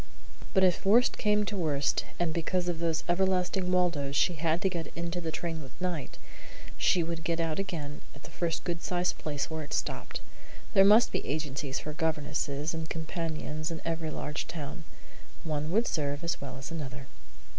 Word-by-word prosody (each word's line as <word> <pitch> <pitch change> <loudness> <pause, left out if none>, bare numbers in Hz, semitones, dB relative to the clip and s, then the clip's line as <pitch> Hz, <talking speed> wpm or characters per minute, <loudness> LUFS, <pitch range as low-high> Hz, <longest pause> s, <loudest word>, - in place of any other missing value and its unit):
But 190 - +6
if 180 -2 +4
worst 230 +6 +5
came 210 0 +3
to 210 - -3
worst, 150 -6 +1
and 170 -2 +1
because 175 +2 0
of 170 -2 0
those 165 -1 +1
everlasting 185 0 +2
Waldos 170 -7 +2
she 160 +7 +4
had 165 +1 +1
to - - +5
get 170 -3 -4
into 170 +1 -2
the 165 - -2
train 165 -1 -3
with 135 -2 -12
Knight, 180 -6 -2 0.6
she 175 - +3
would 165 0 -3
get 170 0 0
out 165 +1 0
again 155 -7 -3
at 140 - -14
the - - -11
first 170 -2 -1
good 170 -2 -2
sized 180 0 0
place 145 0 -2
where 160 0 -2
it 150 - -6
stopped. - - -2 0.5
There 195 -2 +8
must 215 +4 +7
be - - -1
agencies 145 -2 -2
for 150 - -4
governesses 150 -1 -1
and 160 -1 -4
companions 160 -1 -3
in 165 -1 -4
every 165 -1 -1
large 150 0 -3
town. 155 0 -6 0.6
One 155 -1 -1
would 220 +7 +3
serve 145 -4 -1
as 170 - -1
well 140 -2 -5
as 130 +4 -7
another. 135 -5 -5
165 Hz, 185 wpm, -30 LUFS, 150-175 Hz, 0.6 s, There